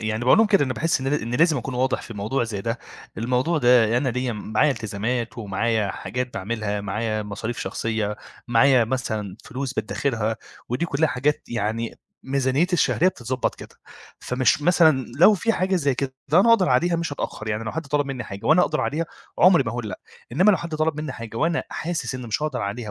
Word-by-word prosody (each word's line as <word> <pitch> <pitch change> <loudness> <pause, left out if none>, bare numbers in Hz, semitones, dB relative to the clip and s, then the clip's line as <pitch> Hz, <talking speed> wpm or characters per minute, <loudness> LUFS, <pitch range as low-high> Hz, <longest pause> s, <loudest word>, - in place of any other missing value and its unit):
يعني 110 +2 -2
باقول 130 - +6
لهم 220 - +6
كده، 200 -8 +4
أنا 130 - -2
باحس 165 -3 0
إن 130 - -4
أنا 145 +2 +2
إن 120 +2 -3
لازم 160 +1 +4
أكون 125 +1 -5
واضح 130 +1 0
في - - -12
الموضوع 115 +4 -1
زي 105 -4 -4
ده. 115 +3 -2 0.4
الموضوع 125 +8 +1
ده 120 -3 +4
أنا 130 +1 0
ليّا 125 0 -1
م 105 0 -7
معايا 150 - +4
التزامات 115 0 -3
ومعايا 110 0 0
حاجات 125 0 -4
بأعملها، 105 0 -3
معايا 110 +2 -2
مصاريف 105 +3 -5
شخصية، 110 -2 -2 0.3
معايا 120 +1 +5
مثلًا 110 -5 -3
فلوس 130 0 -4
بأدّخِرها. 110 0 -1 0.3
ودي 125 +8 -1
كُلّها 155 0 +1
حاجات 145 +3 0
يعني 115 0 -3 0.3
ميزانيتي 135 +6 +1
الشهرية 175 +1 +3
بتتضبّط 125 -6 -2
كده. - - -13 0.4
فمش 130 +3 +1
مثلًا 160 -6 +4
لو 195 +6 +7
في 225 +4 0
حاجة 190 -2 +1
زي 140 -6 +1
كده 130 0 -3
ده 160 +6 +5
أنا 235 - +3
أقدر 215 -7 +5
عليها، 170 +7 +2
مش 165 -3 -3
هاتأخّر. 110 -5 -5
يعني 105 +1 -2
لو 110 - -4
حد 160 -1 -4
طلب 145 0 0
منّي 135 -3 -4
حاجة 100 0 -7
وأنا 160 +3 +5
أقدر 155 - 0
عليها، 160 +4 -1 0.3
عمُري 180 -5 +6
ما 115 - -3
هاقول 120 -1 -4
لأ. - - -7 0.3
إنّما 185 +11 +5
لو 200 - +4
حد 170 -2 -6
طلب 155 0 0
منّي 155 -3 -4
حاجة 115 -2 -8
وأنا 165 +6 +1
حاسس 165 -4 -3
إنّي 125 -1 -6
مش 115 +6 -2
هأقدر 145 -5 -2
عليها 105 +2 -4
125 Hz, 205 wpm, -23 LUFS, 115-150 Hz, 0.4 s, لو